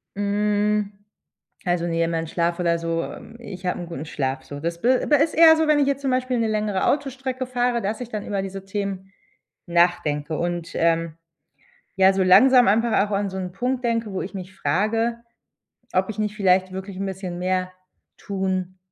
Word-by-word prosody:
Hm, 205 0 0 0.7
also, 175 -1 0
ne, 165 -1 0
mein 165 -1 -2
Schlaf 170 +2 -1
oder 170 -1 +1
so 165 0 -1
ähm, 225 - -9
ich 190 -6 -9
habe 180 - -1
'n 175 - -5
guten 165 -3 -7
Schlaf 135 -3 -3
so. 145 0 -8
Das 170 +2 -4
b 240 - +2
aber 295 -2 +3
ist 315 - +2
eher 320 0 +8
so, 320 -1 +1
wenn 300 -1 +4
ich 280 - +2
jetzt 280 0 0
zum 275 - -1
Beispiel 255 -1 0
'ne 225 - +1
längere 210 -3 0
Autostrecke 265 -2 -1
fahre, 245 -1 0
dass 215 +4 -3
ich 240 - -6
dann 210 -2 -5
über 200 -2 -2
diese 195 0 -7
Themen 195 -1 -4 0.6
nachdenke 165 -3 +1
und, 175 -1 -3
ähm, 165 -1 +1 0.8
ja, 190 0 +5
so 190 -1 +1
langsam 250 +6 +6
einfach 215 0 +3
auch 210 - -10
an 200 0 0
so 190 - -6
'n 185 -1 -4
Punkt 250 +6 -2
denke, 230 -3 -1
wo 190 - -2
ich 190 - -6
mich 190 -1 -8
frage, 215 +9 0 0.7
ob 190 +3 +1
ich 215 - -8
nicht 210 0 -2
vielleicht 185 -2 +3
wirklich 190 0 -7
'n 195 - -2
bisschen 185 -2 -5
mehr 185 0 -1 0.5
tun 190 -2 -3
195 Hz, 195 wpm, -23 LUFS, 175-225 Hz, 0.8 s, eher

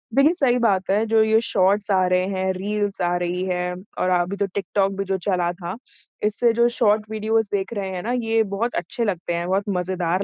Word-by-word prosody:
देखिए 280 +5 +5
सही 270 -8 +2
बात 195 -5 +1
है 210 +3 +2
जो 225 0 +3
ये 220 0 +4
शॉर्ट्स 200 -1 +1
आ 185 -1 +3
रहे 180 0 +2
हैं, 190 -1 -1
रील्स 205 +1 -2
आ 175 0 +1
रही 175 +1 -2
हैं 180 -1 -1 0.3
और 185 - +1
अभी 180 +1 +1
तो 200 - +1
टिक-टॉक 195 0 -1
भी 195 - -1
जो 190 0 -1
चला 180 -2 0
था, 175 -1 -6 0.5
इससे 220 +3 +2
जो 235 +1 +4
शॉर्ट 215 -1 +2
वीडियोस 220 0 0
देख 195 +2 -1
रहे 200 -3 -3
हैं 180 -1 -5
ना 235 - -2
ये 225 0 +2
बहुत 235 +4 -1
अच्छे 240 - -2
लगते 180 -4 -2
हैं, 170 +1 -2
बहुत 190 +2 +1
मज़ेदार 180 -1 -1
195 Hz, 215 wpm, -22 LUFS, 180-220 Hz, 0.5 s, देखिए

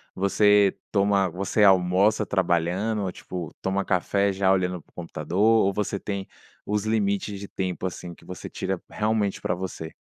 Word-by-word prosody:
Você 100 +1 +4 0.2
toma 100 -2 +2
você 100 +4 0
almoça 95 +3 +4
trabalhando, 95 +3 0
ou, 95 - -2
tipo, 90 -3 -7
toma 95 +1 -1
café 100 +2 +1
já 95 0 +2
olhando 90 -2 0
para - - -32
o - - -33
computador, 85 0 -6
ou 110 -2 +5
você 100 0 -2
tem 100 -2 -4 0.4
os 105 0 -1
limites 100 -2 0
de 100 - -7
tempo, 95 -1 -4
assim, 90 -1 -6
que - - -20
você 90 - -8
tira, 95 -2 -3
realmente, 105 -2 0
pra - - -1
você? 90 -3 -6
95 Hz, 165 wpm, -25 LUFS, 90-105 Hz, 0.4 s, ou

